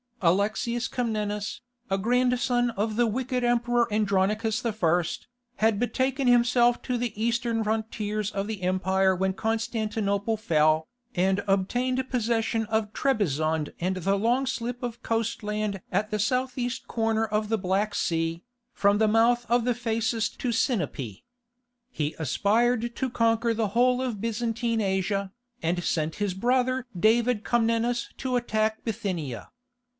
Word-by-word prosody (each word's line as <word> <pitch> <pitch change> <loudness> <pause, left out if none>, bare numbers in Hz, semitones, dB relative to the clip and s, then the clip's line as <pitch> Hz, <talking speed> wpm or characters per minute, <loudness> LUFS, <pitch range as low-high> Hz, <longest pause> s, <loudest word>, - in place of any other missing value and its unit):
Alexius 215 +7 +1
Comnenus, 210 -4 -2 0.3
a 195 - +1
grandson 245 +2 +2
of 215 0 -2
the 240 +1 +3
wicked 250 +2 -1
emperor 240 -1 +2
Andronicus 210 +2 +1
I., 180 -7 +2 0.5
had 220 -2 +2
betaken 260 +2 0
himself 240 0 +4
to 250 -1 -1
the 235 -3 -3
Eastern 235 -1 0
frontiers 215 -1 -2
of 200 0 -2
the 215 -3 -5
empire 190 +1 +2
when 190 +1 0
Constantinople 220 -1 -1
fell, 155 -5 +2 0.3
and 190 +2 +2
obtained 250 +7 0
possession 225 -2 0
of 220 0 -1
Trebizond 160 - 0
and 185 +2 -1
the 195 +2 +1
long 240 +6 +1
slip 245 -1 -3
of 240 -1 -4
coast 230 0 -1
land 210 -2 -2
at 210 +1 0
the 210 - -1
south 250 +4 0
east 245 0 -3
corner 225 -1 0
of 210 0 -1
the 225 - +2
Black 200 +2 0
Sea, 165 0 -1 0.3
from 200 0 +3
the 220 - +4
mouth 235 +2 +3
of 240 0 +3
the 245 -1 +1
Phasis 225 -1 0
to 250 - -1
Sinope. 180 - -1 0.7
He 150 -8 -2
aspired 230 - +1
to 260 - -1
conquer 230 0 +2
the 220 -2 0
whole 250 +4 +3
of 230 -6 -3
Byzantine 230 0 -1
Asia, 195 0 -1 0.3
and 175 +2 0
sent 160 -1 -1
his 205 -3 -1
brother 255 +4 +1
David 225 +2 +3
Comnenus 235 +1 +1
to 255 -1 -2
attack 220 -2 0
Bithynia. 185 - -4
220 Hz, 140 wpm, -26 LUFS, 200-240 Hz, 0.7 s, himself